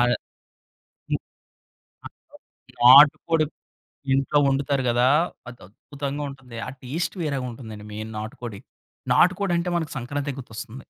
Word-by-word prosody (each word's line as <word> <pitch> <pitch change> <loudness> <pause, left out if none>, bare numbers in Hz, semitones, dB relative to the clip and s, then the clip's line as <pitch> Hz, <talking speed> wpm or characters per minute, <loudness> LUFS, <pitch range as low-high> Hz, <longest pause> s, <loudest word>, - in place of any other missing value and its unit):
ఆ! 120 -1 0 2.5
నాటుకోడి 150 +5 +7 0.7
ఇంట్లో 135 +2 +2
వండుతారు 140 0 0
గదా! 120 +1 +3 0.4
అది 125 - -13
అద్భుతంగా 140 +6 -6
ఉంటుంది. 135 -3 -12
ఆ - - -4
టేస్ట్ 155 +10 -3
వేరేగా 140 -5 -2
ఉంటుందండి 110 -3 -10
మెయిన్ 110 +1 -6
నాటుకోడి. 110 -1 -7 0.5
నాటుకోడి 185 +1 +3
అంటే 175 +1 -2
మనకు 165 -1 -4
సంక్రాంతి 140 +2 -4
గుర్తొస్తుంది. 115 +1 -9
135 Hz, 105 wpm, -24 LUFS, 120-145 Hz, 2.5 s, నాటుకోడి